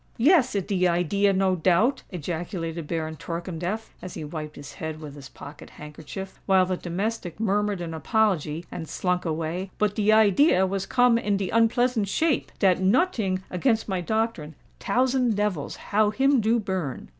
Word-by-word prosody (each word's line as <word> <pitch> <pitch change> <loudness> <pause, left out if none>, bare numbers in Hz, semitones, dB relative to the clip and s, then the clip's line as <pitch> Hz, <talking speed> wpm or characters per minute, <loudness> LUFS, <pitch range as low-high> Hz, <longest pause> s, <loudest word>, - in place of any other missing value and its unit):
"Yes—it 255 - +3
de 185 -3 +2
idea, 180 +4 +2
no 190 -1 +2
doubt!" 190 - +2
ejaculated 170 -1 -5
Baron 160 -1 -3
Torkemdef, 175 +7 -5
as 180 - -8
he 160 - -6
wiped 155 0 -6
his 145 0 -10
head 160 +1 -6
with 150 -3 -9
his 140 -3 -11
pocket 145 +3 -11
handkerchief, 155 +6 -9
while 190 -2 +5
the 185 0 -1
domestic 180 +1 -4
murmured 205 -2 0
an 165 -1 -5
apology 170 -4 0
and 160 -3 -6
slunk 180 -1 -1
away: 165 +3 -3
"but 210 -1 +1
de 210 0 +2
idea 215 - +5
was 195 0 -3
come 245 -2 +4
in 205 -3 0
de 195 -2 -3
unpleasant 230 -1 +2
shape—dat 200 - +1
noting 195 - +1
against 220 +4 +1
my 190 -3 -1
doctrine—tousand 225 - -1
devils, 205 -8 -2
how 210 0 +1
him 270 +3 +2
do 225 +2 +2
burn!" 190 - -4
190 Hz, 155 wpm, -25 LUFS, 165-220 Hz, -, while